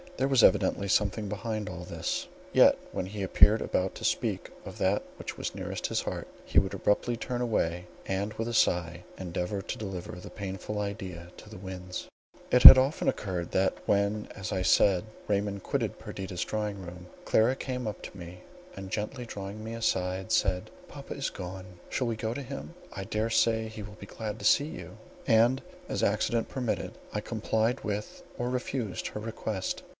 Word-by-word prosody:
There 135 - +2
was 135 -4 +4
evidently 100 - +4
something 105 +1 +1
behind 110 0 -3
all 90 -1 -6
this; - - -3 0.3
yet, - - +7
when 90 - -3
he 100 +1 -6
appeared 105 +3 +5
about 95 +1 -1
to - - -9
speak - - 0
of - - -8
that 95 +2 +2 0.2
which - - -6
was - - -3
nearest - - -3
his - - 0
heart, - - -4 0.2
he - - +5
would 95 0 -2
abruptly 120 +4 +1
turn 125 +1 -3
away, 90 -7 0 0.2
and 100 +3 -2
with 115 - -3
a 120 - -3
sigh 85 -4 +2
endeavour 90 +2 -3
to - - -4
deliver 95 -4 -5
the 90 - -9
painful 100 +1 -5
idea 95 -4 -5
to 105 - -12
the 110 - -9
winds. 90 -1 -6 0.4
It 125 - +5
had - - +15
often 135 +4 +1
occurred, 90 -4 -3
that, 95 0 +2
when, 100 +1 +1
as 95 -3 -5
I 95 - 0
said, 95 +1 +4 0.2
Raymond 100 -1 0
quitted - - -1
Perdita's 95 -2 -5
drawing 105 -2 -2
room, 90 0 -9 0.2
Clara 115 +4 +4
came 125 -3 -4
up 105 - -5
to - - -9
me, 90 0 -9 0.3
and 95 -1 -8
gently 120 +4 -3
drawing 100 -1 -7
me 110 +1 -5
aside, 95 -4 -1
said, 90 -2 +1 0.2
"Papa - - -8
is - - -1
gone; 95 +1 -7 0.2
shall 125 - -1
we 115 - 0
go 110 +1 -2
to 140 - -5
him? 75 - -7 0.2
I 95 - -6
dare 110 +3 -1
say 110 0 +3
he 110 -1 -8
will 100 0 -10
be 100 - -9
glad 110 -1 -5
to - - -6
see 145 - +5
you." - - -8 0.3
And, 120 +4 +4 0.3
as - - -2
accident 110 +3 +1
permitted, 125 -4 -2 0.2
I 105 - -1
complied 110 +1 0
with 105 0 -4
or 120 +1 -1
refused 125 -4 -2
her - - -6
request. 110 -3 -3
105 Hz, 185 wpm, -29 LUFS, 95-110 Hz, 0.4 s, had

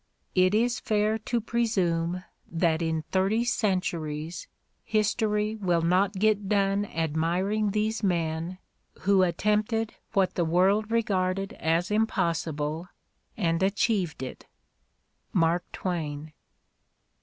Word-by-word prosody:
It 185 +2 +4
is 240 +2 +2
fair 215 0 +1
to 235 +2 -1
presume 185 -7 0 0.3
that 165 -1 +1
in 160 -1 -1
thirty 195 +5 +2
centuries 170 -8 -2 0.4
history 215 0 +1
will 175 -5 +1
not 185 +4 +3
get 205 0 +1
done 200 0 +2
admiring 175 +7 0
these 215 +2 -1
men 170 -2 -1 0.4
who 195 0 +4
attempted 210 +5 +1 0.2
what 195 -3 +2
the 175 - 0
world 190 +6 +2
regarded 195 -4 0
as 165 +4 0
impossible 165 -6 -1 0.5
and 165 -4 +1
achieved 190 - +1
it. 130 - -8 0.9
Mark 170 0 +2
Tvs^ain. 155 -4 -4
190 Hz, 105 wpm, -27 LUFS, 165-210 Hz, 0.9 s, It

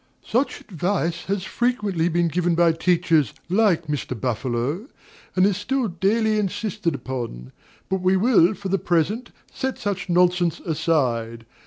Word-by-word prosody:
Such 250 +5 0
advice 175 -2 -2
has 195 -1 -1
frequently 205 -8 0
been 170 0 +1
given 175 +1 +1
by 170 0 +4
teachers 165 - +2 0.2
like 190 -4 +3
Mr. 140 -5 -3
Buffalo, 130 - -2 0.5
and 185 0 +4
is 200 -2 +2
still 250 +4 -1
daily 215 +5 +1
insisted 190 -6 -2
on; 115 - -5 0.4
but 190 -1 -1
we 185 +1 +3
will, 210 -3 +4
for 195 -1 -6
the 195 +1 +1
present, 180 +9 0 0.2
set 265 -1 -3
such 195 -3 -3
nonsense 175 -1 +2
aside. 125 -8 -1
175 Hz, 140 wpm, -23 LUFS, 160-205 Hz, 0.5 s, by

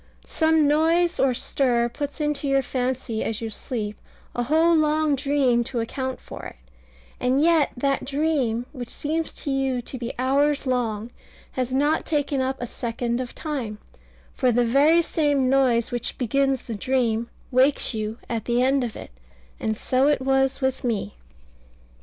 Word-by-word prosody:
Some 320 -2 +2
noise 330 +4 +2
or 260 -2 +3
stir 240 -2 +1
puts 285 +5 -5
into 295 -1 -1
your 275 0 +2
fancy 250 -3 -2
as 220 - -2
you 225 -1 -4
sleep 210 -2 -4 0.3
a 245 - -1
whole 320 +7 +3
long 310 -1 +2
dream 270 -3 +2
to 240 - -3
account 260 +3 -3
for - - -10
it; - - -8 0.6
and 255 +2 +2
yet 320 -1 +4
that 275 +1 0
dream, 275 -5 0
which 250 -5 -7
seems 315 +2 -2
to 285 - -4
you 270 -2 0
to 260 - -6
be 235 0 -3
hours 280 +3 +2
long, 235 -3 -1 0.4
has 255 -1 -2
not 290 +4 +2
taken 290 -3 0
up 265 +1 -1
a 245 - -3
second 235 0 -3
of 250 - -7
time; 260 -9 -4 0.6
for 255 -2 +2
the 240 +1 +2
very 295 +8 +4
same 285 -5 +1
noise 250 -4 +3
which 240 -1 -3
begins 270 +1 +1
the 230 - -6
dream, 235 0 0 0.2
wakes 260 +1 +3
you 215 0 -3
at 230 -2 -3
the 240 0 +1
end 270 0 +2
of 235 -3 -4
it: - - -9 0.5
and 220 -1 -1
so 260 +4 +2
it 295 -1 +3
was 270 +1 +1
with 265 -1 -1
me. 220 - -2
265 Hz, 165 wpm, -24 LUFS, 240-290 Hz, 0.6 s, yet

